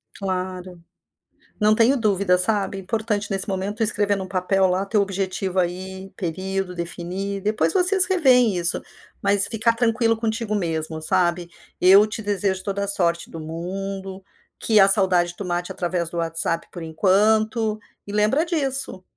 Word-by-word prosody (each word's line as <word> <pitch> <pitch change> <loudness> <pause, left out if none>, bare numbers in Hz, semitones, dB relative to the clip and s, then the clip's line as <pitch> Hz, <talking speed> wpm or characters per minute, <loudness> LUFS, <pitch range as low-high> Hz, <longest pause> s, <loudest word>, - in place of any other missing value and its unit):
Claro. 185 -2 -5 0.8
Não 215 0 +3
tenho 235 +5 +3
dúvida, 200 -4 +1
sabe, 195 +1 0
importante 210 +1 -3
nesse 195 +1 -1
momento 195 +1 -4
tu 225 - 0
escrever 205 -1 +1
num 190 -1 -5
papel 190 +1 0
lá, 185 +2 -1
teu 210 0 +1
objetivo 190 -1 -3
aí, 190 +2 -4
período, 190 +1 -4
definir. 180 +3 -5
Depois 210 +2 0
vocês 375 0 +5
reveem 255 - +3
isso. 175 0 +4 0.4
Mas 200 0 +3
ficar 230 0 +1
tranquilo 230 -1 +1
contigo 225 -1 -3
mesmo, 160 -4 -3
sabe. 175 +1 0 0.3
Eu 195 +3 +7
te 215 +1 -5
desejo 195 -2 -1
toda 200 0 -3
a 200 - -3
sorte 170 -4 +3
do 165 - -9
mundo. 190 +4 -6 0.4
Que 220 -2 +3
a 195 - +7
saudade, 180 -3 +4
tu 200 - -6
mate 175 0 -3
através 175 -1 -3
do 170 - -7
WhatsApp, 165 0 -1
por 175 - -9
enquanto. 215 +6 +1 0.3
E 205 - -7
lembra 210 +9 +1
disso, 270 - 0
195 Hz, 155 wpm, -22 LUFS, 180-215 Hz, 0.8 s, Eu